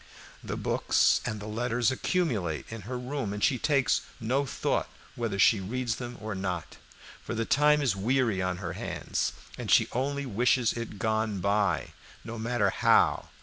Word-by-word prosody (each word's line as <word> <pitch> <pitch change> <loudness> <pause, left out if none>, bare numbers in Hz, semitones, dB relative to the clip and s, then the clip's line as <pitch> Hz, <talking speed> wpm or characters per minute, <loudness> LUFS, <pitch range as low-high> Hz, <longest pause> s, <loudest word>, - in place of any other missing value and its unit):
The - - -4
books - - +2
and 105 - -3
the 105 - -7
letters 120 +3 0
accumulate 120 - -1
in 115 -1 -6
her 125 - -2
room, 125 -4 -3
and 105 - -4
she 130 - +3
takes 140 -5 +2 0.2
no 130 +5 0
thought - - -1 0.3
whether 115 -4 -2
she 105 +2 +5
reads 115 +4 -2
them 120 -1 -6
or 110 0 -4
not, 90 -3 -4 0.4
for - - -5
the 115 0 -1
time 150 +2 +4
is 120 -8 +2
weary 115 -1 +1
on 90 -1 -1
her 90 -3 -5
hands - - -2 0.3
and - - -5
she - - +5
only 140 +3 -1
wishes 120 +1 +2
it 115 -3 -6
gone, 110 -1 0 0.8
no 115 -1 -6
matter 110 -3 +1
how. - - +3
115 Hz, 165 wpm, -28 LUFS, 105-130 Hz, 0.8 s, she